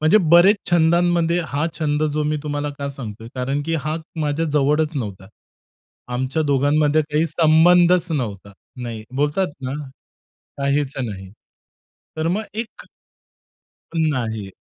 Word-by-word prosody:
म्हणजे 155 +7 +5
बरेच 175 +5 +7
छंदांमध्ये, 170 0 +3
हा 145 +2 -1
छंद 150 -1 0
जो 150 - 0
मी 150 +1 0
तुम्हाला 145 -1 -3
का 140 - -3
सांगतोय, 115 -5 -8
कारण 135 +3 -2
की 165 - 0
हा 155 +1 -1 0.2
माझ्या 150 +2 0
जवळच 150 +2 +2
नव्हता. 100 -7 -5 0.9
आमच्या 130 +5 -1
दोघांमध्ये 145 +2 +2
काही 155 +2 +2
संबंधच 175 +3 +4
नव्हता. 105 -8 -4 0.3
नाही. 115 -2 -6
बोलतात 150 +5 0
ना 130 - -3 0.9
काहीच 140 0 0
नाही. 100 -6 -5 0.9
तर 160 +1 0
मग 205 +6 -1
एक 225 +1 -6 1.1
नाही. 120 -10 -1
150 Hz, 125 wpm, -21 LUFS, 130-165 Hz, 1.1 s, बरेच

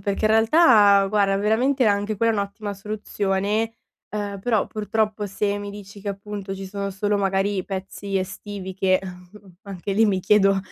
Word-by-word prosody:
perché 200 +1 -2
in 215 - +4
realtà 220 -4 +5
guarda 200 -1 +2
veramente 245 +6 +2
anche 205 0 +1
quella 230 +2 +2
è - - -2
un'ottima 200 +1 -4
soluzione, 205 +1 -2 0.4
uhm, 205 -2 -4
però 220 -1 +1
purtroppo 215 0 -2
se 200 +1 -1
mi 205 0 -6
dici 200 0 -11
che, 200 - -5
appunto, 200 -1 -5
ci 195 0 -7
sono 200 +1 -4
solo 205 +2 -1
magari 195 0 0
pezzi 195 +1 -4
estivi 190 0 -6
che 185 0 +2 0.7
anche 195 0 -5
lì 220 +2 +4
mi 190 -2 +1
chiedo 195 0 +4
200 Hz, 160 wpm, -23 LUFS, 195-210 Hz, 0.7 s, realtà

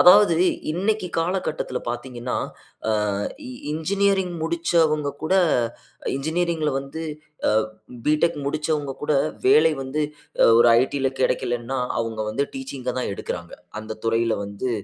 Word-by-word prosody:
அதாவது 185 0 +8 0.4
இன்னைக்கி 190 +3 0
காலகட்டத்தில 165 -6 -1
பாத்தீங்கன்னா, 120 0 -4 0.8
அ - - -2 0.3
இ - - -6 0.2
இன்ஜினியரிங் 190 +3 +1
முடிச்சவங்க 160 -3 +2
கூட, 160 - +1 0.8
இன்ஜினியரிங்‌ல 160 +2 0
வந்து 140 +4 -6 0.5
அ - - +3 0.6
பிடெக் 155 +1 +3
முடிச்சவங்ககூட, 150 -1 -1 0.3
வேலை 160 -5 +6
வந்து 135 +3 -1 0.5
ஒரு 120 0 +7
ஐடில 135 0 0
கெடைக்கலன்னா, 120 +1 0 0.2
அவுங்க 115 -1 -2
வந்து 140 +6 0
டீச்சிங்‌க 130 -1 -5
தான் 115 - -2
எடுக்கிறாங்க. 85 -2 -5 0.3
அந்த 110 0 -7
துறையில 115 0 +2
வந்து 100 +5 -4
150 Hz, 110 wpm, -24 LUFS, 125-170 Hz, 0.8 s, அதாவது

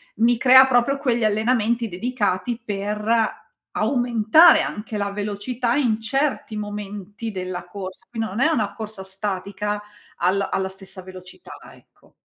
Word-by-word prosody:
mi 235 +1 +3
crea 260 +1 +8
proprio 260 +2 +2
quegli 240 -4 0
allenamenti 225 +2 +1
dedicati 220 +2 -2
per 210 +2 -1 0.3
aumentare 245 +5 +5
anche 210 0 -5
la 200 0 -2
velocità 220 +4 -2
in 230 -6 +1
certi 270 -3 -1
momenti 205 +1 -6
della 185 -2 -5
corsa. 185 0 -8
Quin 225 -2 -3
non 215 +3 -3
è 310 - +5
una 215 -9 0
corsa 215 -3 -7
statica 200 +1 -3 0.4
alla 190 +3 +1
alla 190 0 0
stessa 190 0 -9
velocità, 185 - -12 0.2
ecco. - - -24
210 Hz, 130 wpm, -22 LUFS, 200-240 Hz, 0.4 s, crea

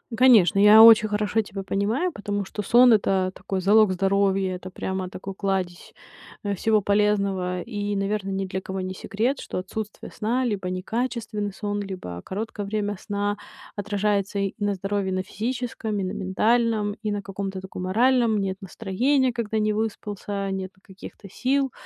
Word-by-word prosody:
Конечно, 220 -7 +6
я 210 +2 +9
очень 220 -1 +8
хорошо 210 +1 +1
тебя 195 -1 -7
понимаю, 215 - 0
потому 205 -4 -3
что 210 - -5
сон 240 +3 +6
это 190 -3 +2
такой 190 -1 -4
залог 210 +1 +5
здоровья, 195 0 +1
это 185 +1 -8
прямо 190 0 -4
такой 190 +1 -7
кладезь, 190 -3 -3 0.5
э, 200 0 -1
всего 215 +2 +2
полезного. 200 -3 +1
И, 205 -3 -3
наверно, 195 0 -1
ни 195 0 -2
для 190 0 -4
кого 190 0 -5
не 185 0 -4
секрет, 230 +8 -2
что - - -6
отсутствие 210 +3 -6
сна 245 +4 -1
либо 195 -5 -2
некачественный 215 +1 -3
сон, 205 +1 -3
либо 180 - -6
короткое 205 +1 -5
время 205 -1 -2
сна 205 0 -2 0.4
отражается 205 -1 -1
и 195 0 -1
на 205 -1 0
здоровье, 195 +1 -2
и - - -1
на 185 - -1
физическом, 225 0 -3
и - - -1
на 185 - -2
ментальном, 215 +2 +1
и 215 -1 -2
на 205 0 -2
каком-то 195 -1 -5
таком 185 -1 -7
моральном 230 +3 +3
нет 190 -1 -2
настроения, 245 +7 0
когда 220 -2 -2
не 215 0 +1
выспался, 205 -2 -3
нету 190 0 -5
каких-то 195 +1 -12
сил. 265 +5 0
205 Hz, 165 wpm, -24 LUFS, 190-220 Hz, 0.5 s, я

